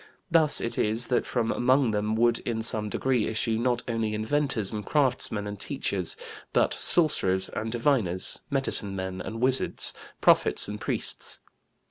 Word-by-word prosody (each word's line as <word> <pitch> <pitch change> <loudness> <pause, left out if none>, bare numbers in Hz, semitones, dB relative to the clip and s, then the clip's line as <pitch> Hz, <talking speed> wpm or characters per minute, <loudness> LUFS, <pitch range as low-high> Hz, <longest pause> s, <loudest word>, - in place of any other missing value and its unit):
Thus 160 -3 +5
it 115 - -1
is 110 +3 +1
that - - +1
from 115 -2 -1
among 130 0 +2
them 105 +1 -1
would 120 +1 +2
in 115 -2 -3
some 110 -2 +1
degree 125 0 0
issue 110 0 -1
not 120 0 0
only 115 -2 -2
inventors 115 -1 0
and 105 -1 -4
craftsmen 125 -7 0
and 105 -1 -7
teachers, - - -2 0.4
but - - +2
sorcerers 95 - +3
and 110 +1 -5
diviners, 115 -8 0
medicine 135 -8 +1
men 95 -1 -5
and 115 +1 -7
wizards, 130 +1 0 0.3
prophets - - +3
and 105 +1 -7
priests. - - -1
115 Hz, 150 wpm, -26 LUFS, 105-130 Hz, 0.4 s, Thus